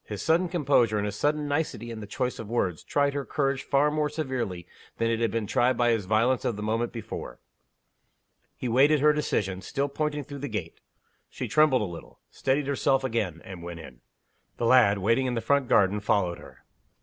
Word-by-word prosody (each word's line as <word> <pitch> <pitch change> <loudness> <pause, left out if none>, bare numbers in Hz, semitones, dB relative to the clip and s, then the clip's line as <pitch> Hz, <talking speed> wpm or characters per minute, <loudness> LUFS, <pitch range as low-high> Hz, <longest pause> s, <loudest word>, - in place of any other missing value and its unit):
His 105 -2 -6
sudden 170 +2 +2
composure, 135 -10 +2
and 105 - -1
his 100 -1 -3
sudden 150 +5 0
nicety 145 -5 -2
in 115 - -6
the 105 - -8
choice 125 +4 -3
of 110 - -7
words, 95 -8 -1
tried 140 -1 +1
her 140 0 -2
courage 135 -2 -1
far 145 +2 +2
more 150 0 0
severely 130 - -3 0.3
than 115 0 +1
it 115 - 0
had 115 -1 +1
been 115 -1 -2
tried 125 +5 +2
by 120 -1 +3
his 110 -4 0
violence 115 +5 +2
of 115 - -1
the 105 - -6
moment 115 +2 -1
before. 110 - -7 1.2
He - - -4
waited 140 +6 +4
her 150 0 +5
decision, 95 -10 -1
still 140 +6 -2
pointing 150 0 -2
through 140 0 -9
the 145 - -4
gate. - - -5 0.5
She - - -5
trembled 150 -6 +4
a - - -1
little 85 -3 -10
steadied 135 +2 0
herself 135 -1 +1
again 105 -10 -2
and 95 -2 -9
went 85 0 -7
in. 65 -6 -12 0.6
The 120 - -1
lad, 115 -4 +5
waiting 115 +7 +1
in 125 - -1
the - - 0
front 140 +2 +1
garden, 100 -1 +3
followed 95 -4 0
her. - - -15
120 Hz, 205 wpm, -27 LUFS, 105-140 Hz, 1.2 s, her